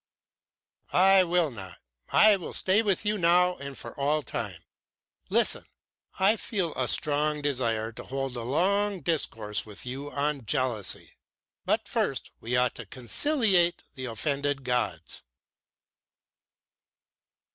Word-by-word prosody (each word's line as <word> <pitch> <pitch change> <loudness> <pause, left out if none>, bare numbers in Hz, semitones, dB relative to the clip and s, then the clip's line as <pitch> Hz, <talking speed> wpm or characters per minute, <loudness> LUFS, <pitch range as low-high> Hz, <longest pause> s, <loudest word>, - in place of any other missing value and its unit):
"I 190 +1 +6
will 175 -3 +1
not, 95 -6 -9 0.3
I 215 -1 +6
will 185 - -7
stay 190 +3 +2
with 200 -2 0
you 210 0 +1
now 180 +1 +4
and 140 -1 -8
for - - -6
all 150 +2 +1
time. - - -5 0.7
Listen! - - +2 0.5
I 200 +4 +4
feel 185 -9 -2
a 130 - -1
strong 150 +1 +1
desire 115 -6 -1
to 110 - -10
hold 135 -1 -4
a 120 - -4
long 190 - 0
discourse 115 -10 -1
with 105 +1 -7
you 135 +3 -5
on 140 -4 -2
jealousy. 115 -2 0 0.5
But - - 0
first - - -2
we 120 +2 -2
ought 125 0 +2
to 115 - -8
conciliate 175 - +2
the 130 - -6
offended 140 +4 -1
gods." 125 -10 -2
145 Hz, 125 wpm, -27 LUFS, 125-180 Hz, 0.7 s, I